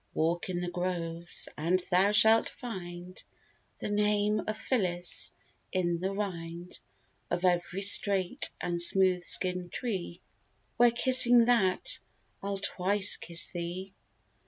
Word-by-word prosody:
Walk 170 +3 -1
in 175 -1 -3
the 180 - -4
groves, 175 -1 -3
and 170 +5 0
thou 190 +3 +3
shalt 220 +2 +4
find 180 -5 -9 0.5
The - - -5
name 210 0 +1
of 215 0 -3
Phillis 180 -8 -2 0.4
in 175 -2 -1
the 190 +2 -2
rind 175 -4 -6 0.5
Of 180 - -2
every 180 +2 0
straight 195 -2 +2
and 175 -1 -2
smooth 185 +1 +2
skin 180 0 -1
tree; 185 -5 -5 0.6
Where 240 0 +6
kissing 245 0 +6
that, 235 - +1 0.4
I'll 200 0 -3
twice 200 +1 +1
kiss 170 0 -1
thee. 180 +2 -6
185 Hz, 120 wpm, -29 LUFS, 175-205 Hz, 0.6 s, Where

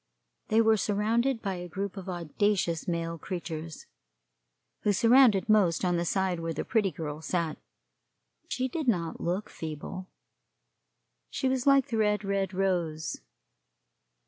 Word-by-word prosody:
They 220 +1 +4
were 220 -1 +4
surrounded 225 +5 +1
by 195 -3 -2
a 175 0 -6
group 195 +4 -4
of 195 -1 -7
audacious 175 0 0
male 165 -1 -2
creatures, 165 -2 -6 0.9
who 205 - +1
surrounded 230 -2 +5
most 195 -5 +3
on 175 -1 +2
the 170 0 0
side 190 -1 0
where 165 0 -3
the - - -3
Pretty 215 -4 +2
Girl 155 -2 -6
sat. 165 -2 -2 0.9
She 260 0 -1
did 300 +2 -4
not 170 -8 0
look 180 +5 -1
feeble. 160 +4 -7 1.2
She - - -1
was 260 0 0
like 275 -2 +5
the 230 - -1
red, 210 -1 +2
red 195 -1 -1
rose. 175 - -1
190 Hz, 140 wpm, -29 LUFS, 170-215 Hz, 1.2 s, surrounded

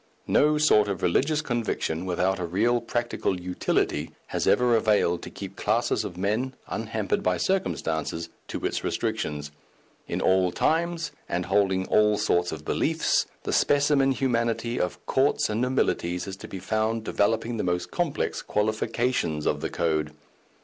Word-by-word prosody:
No 150 +1 +3
sort 110 -9 +4
of 100 -2 -3
religious 150 - +2
conviction, 110 - -2
without 90 +2 +1
a 90 - -2
real 115 +7 +2
practical 120 -6 -2
utility, 90 0 -1 0.2
has - - -1
ever 125 -1 +4
availed 105 -6 +2
to - - -7
keep - - -8
classes - - +1
of 90 - -6
men, 110 +8 -1
unhampered 110 -2 -2
by 90 -1 +1
circumstances, 85 - -1 0.2
to - - -4
its - - -1
restrictions. 75 -1 -2 0.6
In - - -2
all 95 -1 +3
times, 165 - 0 0.2
and 90 0 -1
holding 95 -2 +2
all 105 0 +4
sorts 90 -2 +1
of 75 -1 -7
beliefs, - - +1 0.2
the - - -2
specimen 140 -1 +3
humanity 115 -2 0
of 90 - -3
courts 135 -4 +2
and 110 +2 -1
nobilities 90 -9 0
is 95 - -6
to - - -9
be 95 - -7
found 110 +4 -1
developing 115 +2 0
the - - -1
most 90 0 -1
complex 175 -5 -1
qualifications 110 -6 -1
of - - 0
the - - -2
code. 75 -2 -1
105 Hz, 150 wpm, -26 LUFS, 90-125 Hz, 0.6 s, sort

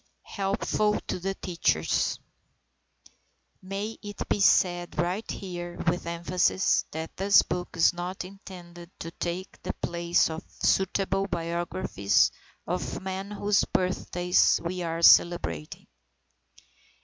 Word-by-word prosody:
HELPFUL 210 +1 0
TO - - -4 0.2
TEACHERS 175 -3 0 1.4
May 200 +3 -5
it 205 -1 -6
be - - 0
said 175 -2 +3
right 180 +6 -1
here, 175 -2 -6
with 175 0 0
emphasis, 175 +3 +1
that 160 +1 -6
this 200 +1 +5
book 180 0 -3
is 165 - +5
not 180 +1 -5
intended 175 -3 -11
to 165 - -6
take 175 +2 -5
the - - -3
place 170 0 +1
of 160 +1 -6
suitable 195 0 +1
biographies 170 - +1 0.3
of - - -3
the - - -4
men 190 +1 -5
whose 205 0 +1
birthdays 180 -1 +2
we 180 +1 -3
are 165 0 -3
celebrating. 85 - +4
180 Hz, 115 wpm, -27 LUFS, 170-195 Hz, 1.4 s, this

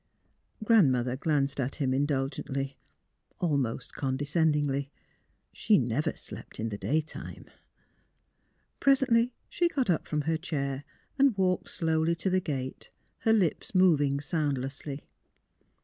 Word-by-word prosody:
Grandmother 130 - +4
glanced 140 -1 0
at 130 +1 -1
him 135 -4 0
indulgently, 135 0 -1 0.6
al 165 -5 +1
most 125 -5 -2
condescendingly. 145 0 0 0.6
She - - +3
never - - 0
slept - - -10
in 115 +1 -1
the 105 - -4
day 155 +3 +1
time. 155 - -9 1.3
Presently, 255 -3 +4 0.2
she 345 0 +1
got 265 - +1
up 165 - -1
from 150 -1 0
her 160 +2 0
chair 140 -4 -3 0.3
and 270 -6 +4
walked 185 -1 +1
slowly 160 0 +1
to 185 +3 -1
the 185 0 +2
gate, 135 -6 -4 0.3
her 225 - +2
lips 195 -3 +1
moving 145 -7 +4
soundlessly. 140 -2 -3
150 Hz, 120 wpm, -29 LUFS, 135-180 Hz, 1.3 s, Grandmother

